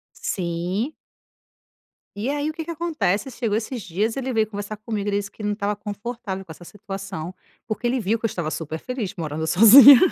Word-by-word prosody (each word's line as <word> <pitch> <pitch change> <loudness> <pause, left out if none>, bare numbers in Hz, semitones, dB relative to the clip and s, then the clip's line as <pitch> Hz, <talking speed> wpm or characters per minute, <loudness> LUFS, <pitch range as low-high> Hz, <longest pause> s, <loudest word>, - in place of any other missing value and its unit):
Sim. 180 - -2 1.2
E 230 +7 -2
aí 290 +1 -1
o - - -2
que 325 0 -6
que 340 - -7
acontece? 305 - -1
Chegou 230 -4 -1
esses 230 +1 -4
dias, 205 +8 -1
ele 265 -1 -2
veio 220 -2 +2
conversar 205 0 -6
comigo, 210 -1 -4
ele 200 - +1
disse 200 -1 -2
que 215 - -12
ele 210 - -1
não 205 - 0
estava 205 0 -1
confortável 205 -1 -6
com 165 - -10
essa 175 - -15
situação 195 -3 -7 0.3
porque 235 +2 -2
ele 255 +1 +1
viu 220 +1 0
que - - -15
eu - - +3
estava 165 -5 -3
super 160 0 -4
feliz 250 -5 -4
morando 160 -1 -3
sozinha. 235 - +10
210 Hz, 200 wpm, -23 LUFS, 190-240 Hz, 1.2 s, sozinha